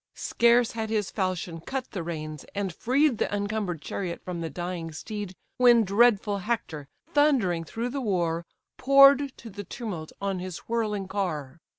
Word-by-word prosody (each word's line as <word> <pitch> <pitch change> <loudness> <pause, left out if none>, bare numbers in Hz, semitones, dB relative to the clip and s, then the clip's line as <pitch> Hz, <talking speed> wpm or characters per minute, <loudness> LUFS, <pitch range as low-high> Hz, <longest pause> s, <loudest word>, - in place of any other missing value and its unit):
Scarce 235 0 +3
had 220 -1 -4
his 215 -3 -1
falchion 185 -4 -2
cut 265 +7 -4
the 185 - -4
reins, 155 -3 -5
and 200 -3 -2
freed 260 - +2
The - - 0
encumber'd 205 -5 -2
chariot 175 -3 -4
from 180 -2 -4
the 165 - -3
dying 175 -2 -5
steed, 205 +2 -6 0.2
When 240 -2 +6
dreadful 205 0 +3
Hector, 195 -9 -3 0.3
thundering 240 - +3
through 230 +8 -3
the 275 +2 -3
war, 170 -7 0 0.3
Pour'd 275 +1 +6
to 230 - -10
the 205 +1 -7
tumult 185 -7 -6
on 195 -2 -2
his 180 -1 -5
whirling 215 -4 -1
car. 170 -7 -3
200 Hz, 160 wpm, -27 LUFS, 175-235 Hz, 0.3 s, When